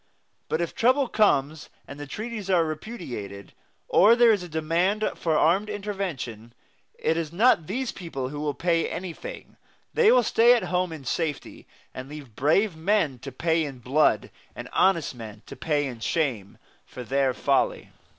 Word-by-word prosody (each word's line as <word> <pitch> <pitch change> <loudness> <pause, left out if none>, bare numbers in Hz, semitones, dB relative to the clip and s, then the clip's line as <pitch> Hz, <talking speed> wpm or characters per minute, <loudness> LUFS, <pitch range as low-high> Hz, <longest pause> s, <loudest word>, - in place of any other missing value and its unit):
But 160 - 0
if 170 - -3
trouble 260 +3 +3
comes 155 -10 +1 0.2
and 140 - -10
the 145 - -7
treaties 215 +3 -6
are 175 -3 +3
repudiated, 140 - -7 0.3
or 215 +5 +6
there 240 -1 +6
is 205 -4 +1
a 180 - -8
demand 170 +7 0
for 160 -2 0
armed 195 +6 +2
intervention, 180 - -5 0.4
it 160 - 0
is 160 -2 -3
not 175 -4 +3
these 250 +5 -2
people 135 -8 -5
who 145 +1 -6
will 150 -1 -2
pay 170 -1 +1
anything; 190 - -7 0.4
they 465 -2 +5
will 250 -1 +5
stay 235 +2 +5
at 235 - -1
home 180 -1 +1
in 155 -4 -9
safety, 150 +2 -4 0.3
and 130 +1 -8
leave 145 -7 -10
brave 165 +7 +2
men 160 -6 0
to 135 +3 -8
pay 160 +5 0
in 140 -3 -6
blood, 130 +6 +1 0.2
and - - -8
honest 180 -7 +2
men 110 -3 -10
to - - -10
pay 150 -2 0
in 125 -4 -6
shame, 120 - -2 0.3
for 125 - -8
their 135 +2 +1
folly. 135 +2 0
160 Hz, 170 wpm, -25 LUFS, 135-200 Hz, 0.4 s, or